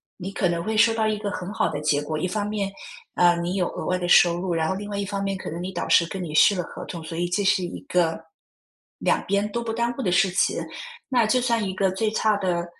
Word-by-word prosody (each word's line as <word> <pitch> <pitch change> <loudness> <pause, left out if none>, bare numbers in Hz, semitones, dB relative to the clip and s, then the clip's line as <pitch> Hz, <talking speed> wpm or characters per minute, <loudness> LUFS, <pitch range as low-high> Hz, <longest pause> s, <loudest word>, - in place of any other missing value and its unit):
你 190 +1 -6
可 195 - 0
能 170 -1 -1
会 220 +4 -2
收 225 +1 +5
到 225 -1 0
一 215 -1 0
个 205 -1 -3
很 185 -1 -5
好 - - +1
的 - - -4
结 150 -1 +1
果。 155 +1 -3
一 155 - -1
方 205 +2 -2
面， 200 -2 -2 0.4
呃， 175 -1 +5
你 175 +1 -2
有 180 -3 +1
额 - - -5
外 185 0 0
的 175 - -2
收 175 -1 +5
入， 180 -1 -2
然 160 -1 0
后 190 - 0
另 205 +2 -6
外 200 - -4
一 200 - -1
方 200 0 -3
面 195 -1 -2
可 - - -6
能 170 +2 -5
你 185 +1 -4
导 175 - -4
师 170 - +5
跟 190 +1 -5
你 155 -3 -6
续 200 +6 +6
了 180 - -1
合 - - -9
同， 170 -2 -7
所 165 +1 -7
以 175 +1 0
这 200 +3 0
是 190 -1 +2
一 175 - -5
个 170 -2 0 0.8
两 - - +1
边 200 +1 +1
都 235 +2 -2
不 230 - -3
耽 235 +1 0
误 - - -3
的 185 - 0
事 180 +2 +4
情。 185 - +1 0.5
那 245 -4 +2
就 250 +4 +3
算 235 -3 +1
一 190 - -2
个 190 0 +1
最 215 +4 0
差 215 0 +1
的， 175 -3 -1
190 Hz, 305 characters per minute, -24 LUFS, 175-210 Hz, 0.8 s, 续